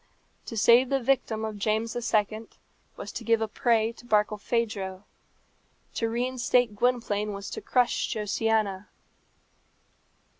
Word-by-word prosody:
To 230 - -6
save 240 +4 +5
the 275 - +1
victim 235 -4 0
of 215 -2 -6
James 220 +2 -1
II. 220 -2 0 0.5
was - - -7
to - - -6
give 230 -1 +3
a 220 - -1
prey 225 0 +1
to 240 - -16
Barkilphedro. 210 -2 -1 0.9
To 230 - -1
reinstate 245 -1 +1
Gwynplaine 210 -3 0
was 200 0 -7
to - - -5
crush 245 -1 +1
Josiana. 210 -2 0
225 Hz, 120 wpm, -27 LUFS, 210-240 Hz, 0.9 s, save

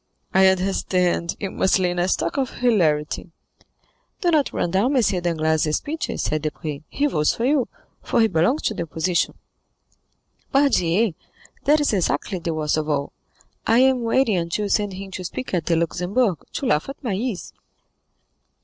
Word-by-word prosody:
"I 190 0 +6
understand; 180 -2 +1
you 195 -2 -3
must 190 - +2
lay 180 -2 +1
in 175 - -3
a 175 - +2
stock 170 -2 0
of 265 -3 0
hilarity." 170 -10 +1 0.9
"Do 350 -3 +2
not 300 -4 +2
run 170 - -1
down 220 +10 +2
M. 255 - +4 0.2
Danglars' 160 -2 +1
speeches," 315 +2 -4
said 155 0 -1
Debray; 150 -1 -4
"he 285 - 0
votes 150 - +1
for 230 - -1
you, 275 -2 +2 0.3
for - - 0
he 225 - +5
belongs 180 - +1
to - - 0
the 185 - -4
opposition." 170 +2 -1 1.2
"Pardieu, 225 - +3 0.5
that 300 +2 +5
is 290 -6 +1
exactly 185 0 0
the 165 0 -3
worst 155 -1 0
of 155 0 -2
all. 140 -1 -1 0.5
I 225 - +4
am 260 -1 +4
waiting 230 -2 +2
until 170 +5 -1
you - - -3
send 205 -1 +1
him 195 +1 -8
to 185 - -6
speak 250 +7 -6
at 170 -3 -1
the 170 - +3
Luxembourg, 180 - 0
to - - -3
laugh 155 - +1
at 275 - -9
my 230 -6 -1
ease." 210 -1 -3
190 Hz, 175 wpm, -22 LUFS, 165-240 Hz, 1.2 s, I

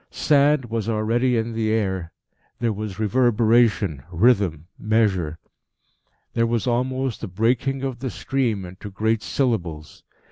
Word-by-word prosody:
Sand 145 -2 +3
was 115 -1 -2
already 115 +3 +1
in 115 +1 -2
the 110 -1 -1
air. 95 -6 -1 0.5
There 115 -2 0
was 105 -2 -5
reverberation, 110 - +2
rhythm, 90 -5 +2
measure; 100 -8 +1 1.0
there 115 0 +2
was 115 -2 -1
almost 130 +1 -1
the 115 - -4
breaking 125 +7 0
of 130 -3 -3
the 130 +1 -3
stream 115 -7 -1
into 95 +3 -9
great 110 +2 0
syllables. 90 - -2
115 Hz, 130 wpm, -23 LUFS, 100-120 Hz, 1.0 s, Sand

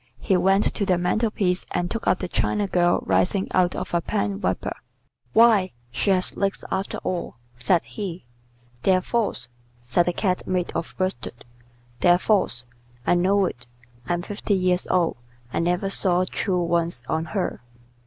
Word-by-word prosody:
He 195 - +1
went 195 +3 +3
to - - -1
the 185 -3 +2
mantel 180 +6 +1
piece 185 -4 0
and 175 0 -2
took 230 - -3
up - - +4
the - - -4
China 205 +3 0
girl 175 -2 +2
rising 195 +1 +1
out 180 -1 +2
of - - -5
a 170 - +2
pen 100 -10 -2
wiper. - - -1 0.6
"Why, 220 -5 +5 0.2
she 125 - -1
has 185 -1 +1
legs 195 -1 -1
after 190 +1 -2
all," 180 -6 -3 0.2
said 125 +9 +2
he. 185 - -6 0.6
"They're 185 +3 +3
false," 205 - -1 0.4
said 130 +9 +2
the 175 - +1
Cat 185 -2 -1
made 180 -1 -1
of 165 - -4
worsted. 125 -10 -3 0.5
"They're 175 0 +5
false. 180 - +1 0.4
I - - +4
know 190 +3 +3
it. 120 -8 -6 0.4
I'm 175 0 0
fifty 205 +1 -1
years 180 -1 +1
old. 175 -6 +1 0.4
I - - 0
never 180 +3 0
saw 185 -2 +3
true 180 -1 -1
ones 170 -6 0
on 160 +1 -1
her." 185 - -2
180 Hz, 165 wpm, -24 LUFS, 175-195 Hz, 0.6 s, Why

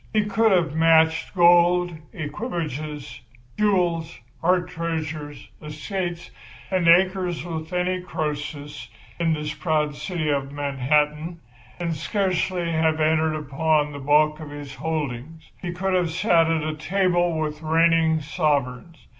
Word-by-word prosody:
He 215 -1 +2
could 220 +2 +2
have 170 -5 +2
matched 160 +1 +3
gold, 175 0 +4 0.2
equipages, 155 - -5 0.3
jewels, 180 -6 +1 0.2
art 180 +1 +2
treasures, 160 -3 -5
estates 175 +3 -5 0.4
and 185 -3 +1
acres 180 0 +3
with 160 -1 -5
any 180 +1 0
Croesus 150 -5 -5 0.3
in 165 -1 +2
this 150 -1 -3
proud 150 -1 0
city 165 -2 -3
of 140 -1 -1
Manhattan, 150 +4 0 0.4
and 170 -2 -2
scarcely 185 -1 -1
have 160 -1 +1
entered 155 0 +2
upon 150 +1 0
the 145 - -7
bulk 150 +2 +3
of 155 -2 -8
his 145 -2 -8
holdings. 150 +1 -5
He 175 - -3
could 190 +2 -2
have 180 -2 +2
sat 165 -1 +3
at 155 -1 -1
table 175 -1 +1
with 150 -1 -3
reigning 160 0 +3
sovereigns. 150 -1 -2
160 Hz, 125 wpm, -23 LUFS, 150-175 Hz, 0.4 s, gold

